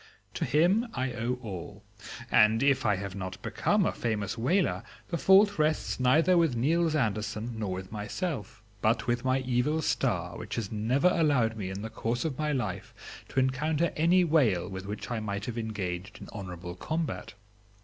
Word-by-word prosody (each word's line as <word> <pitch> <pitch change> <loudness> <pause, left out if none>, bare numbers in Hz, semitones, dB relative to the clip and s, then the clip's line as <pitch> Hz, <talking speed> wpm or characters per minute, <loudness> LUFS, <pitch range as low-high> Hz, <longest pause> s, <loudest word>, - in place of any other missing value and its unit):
To - - -2
him 180 - +3
I 130 0 -1
owe 120 +2 -1
all, 100 0 -7 0.5
and 110 +2 +5
if 140 -4 +3
I 105 - +3
have 100 0 -5
not 95 -1 -6
become - - +1
a - - +2
famous 110 -3 -2
whaler 120 - +1 0.3
the 170 - -1
fault 200 +1 +5
rests 155 -2 +1
neither 155 +8 +4
with 160 -7 +2
Niels 160 +6 +2
Andersen 110 -2 -2
nor 100 -4 -2
with 95 0 -7
myself, 110 - -4 0.2
but 115 +1 +2
with 120 0 0
my 130 0 +1
evil 130 +5 +1
star, - - -1
which - - -5
has 110 -4 -3
never 120 +10 +2
allowed 140 -10 +2
me 100 -4 -4
in 95 +2 -5
the 110 - -4
course 115 +3 -2
of 155 -4 -3
my 150 -1 0
life 130 -4 -3 0.3
to - - 0
encounter 150 +5 +1
any 175 +4 +4
whale 135 - +2
with 95 0 -7
which 105 +4 -6
I 120 - -1
might 100 -1 -4
have 120 -1 -4
engaged 95 -3 -4
in - - -10
honorable 90 -3 -6
combat. 155 - -4
120 Hz, 180 wpm, -29 LUFS, 105-150 Hz, 0.5 s, and